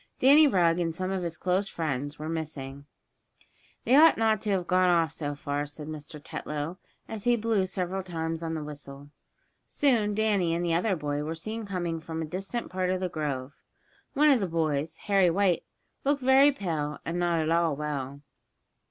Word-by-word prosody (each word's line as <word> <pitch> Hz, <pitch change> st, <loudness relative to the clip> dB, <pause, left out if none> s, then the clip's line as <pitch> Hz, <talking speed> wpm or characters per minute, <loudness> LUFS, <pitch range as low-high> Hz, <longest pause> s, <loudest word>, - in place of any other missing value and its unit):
Danny 290 Hz, +4 st, +7 dB
Rugg 175 Hz, -7 st, +3 dB
and 165 Hz, -2 st, -1 dB
some 185 Hz, +2 st, -3 dB
of 190 Hz, -1 st, -1 dB
his 170 Hz, -2 st, -4 dB
close 185 Hz, +2 st, 0 dB
friends 145 Hz, -3 st, -3 dB
were 155 Hz, -, -6 dB
missing. 145 Hz, -4 st, -5 dB, 1.0 s
"They 255 Hz, -, +4 dB
ought 320 Hz, +3 st, +7 dB
not 220 Hz, -2 st, +2 dB
to 215 Hz, -, -3 dB
have 190 Hz, -3 st, +1 dB
gone 185 Hz, +1 st, +3 dB
off 165 Hz, -2 st, +3 dB
so 145 Hz, -2 st, -4 dB
far," 145 Hz, 0 st, -3 dB
said 150 Hz, +1 st, -8 dB
Mr. 150 Hz, -1 st, -8 dB
Tetlow, 150 Hz, +4 st, -5 dB, 0.3 s
as 220 Hz, -3 st, -7 dB
he 240 Hz, 0 st, +4 dB
blew 220 Hz, -4 st, +1 dB
several 185 Hz, 0 st, -3 dB
times 165 Hz, -3 st, -4 dB
on 165 Hz, -1 st, -3 dB
the 155 Hz, -, -4 dB
whistle. 145 Hz, -1 st, -9 dB, 0.6 s
Soon 225 Hz, -8 st, +2 dB
Danny 200 Hz, -6 st, +1 dB
and 175 Hz, +1 st, -1 dB
the 170 Hz, -, +1 dB
other 185 Hz, +4 st, +1 dB
boy, 145 Hz, -2 st, -2 dB
were 160 Hz, +2 st, -4 dB
seen 215 Hz, +6 st, -5 dB
coming 175 Hz, -4 st, -2 dB
from 160 Hz, 0 st, -6 dB
a 160 Hz, -, -2 dB
distant 195 Hz, +9 st, -4 dB
part 185 Hz, 0 st, -1 dB
of 185 Hz, 0 st, 0 dB
the 185 Hz, -1 st, -2 dB
grove. 145 Hz, -4 st, -3 dB, 0.6 s
One 300 Hz, +2 st, +5 dB
of 265 Hz, -, +4 dB
the 195 Hz, -, -1 dB
boys, 160 Hz, -1 st, -1 dB
Harry 195 Hz, -3 st, +4 dB
White, 180 Hz, -1 st, +1 dB, 0.4 s
looked 280 Hz, 0 st, +1 dB
very 265 Hz, +2 st, +6 dB
pale, 160 Hz, -, -3 dB
and 170 Hz, +1 st, -2 dB
not 175 Hz, -1 st, +1 dB
at 160 Hz, 0 st, 0 dB
all 165 Hz, -3 st, +2 dB
well. 140 Hz, -2 st, -4 dB
170 Hz, 190 wpm, -28 LUFS, 150-195 Hz, 1.0 s, Danny